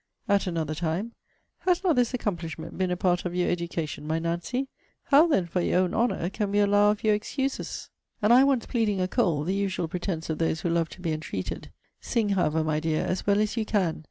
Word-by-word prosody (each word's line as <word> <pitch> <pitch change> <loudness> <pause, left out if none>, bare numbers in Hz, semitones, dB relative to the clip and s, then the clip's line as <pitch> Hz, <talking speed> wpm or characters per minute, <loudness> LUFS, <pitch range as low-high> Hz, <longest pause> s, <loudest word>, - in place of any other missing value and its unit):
At 200 -2 +2
another 160 -3 -2
time, 170 +8 -2 0.5
'Has 360 0 +1
not 350 -5 +3
this 245 -1 +2
accomplishment 165 - -4
been 185 -1 0
a 180 - -1
part 180 -1 +1
of 180 -1 -4
your 180 -1 +1
education, 170 -3 -3
my 160 +1 0
Nancy? 170 +11 -2 0.4
How, 300 +4 +5
then, 195 - +2
for 175 +1 -1
your 180 - +2
own 180 -1 0
honour, 230 -6 +1
can 205 0 -2
we 205 - 0
allow 205 0 +4
of 210 0 -1
your 215 -1 +4
excuses?' 265 +6 -3 0.3
And 215 +1 +4
I 255 +2 +8
once 270 -4 +2
pleading 220 -5 0
a 185 - +1
cold, 155 -5 +1
the 185 - 0
usual 195 -4 -1
pretence 175 -1 -3
of 155 - -3
those 160 -1 0
who 175 - -1
love 165 -1 +1
to - - -14
be 170 -3 -1
entreated 155 -12 -4 0.3
'Sing, 220 -3 0
however, 160 -5 +1
my 155 -1 0
dear, 155 0 0
as 185 - -2
well 200 0 +4
as 215 +1 0
you 225 - 0
can. 195 -7 0
185 Hz, 220 wpm, -27 LUFS, 165-215 Hz, 0.5 s, I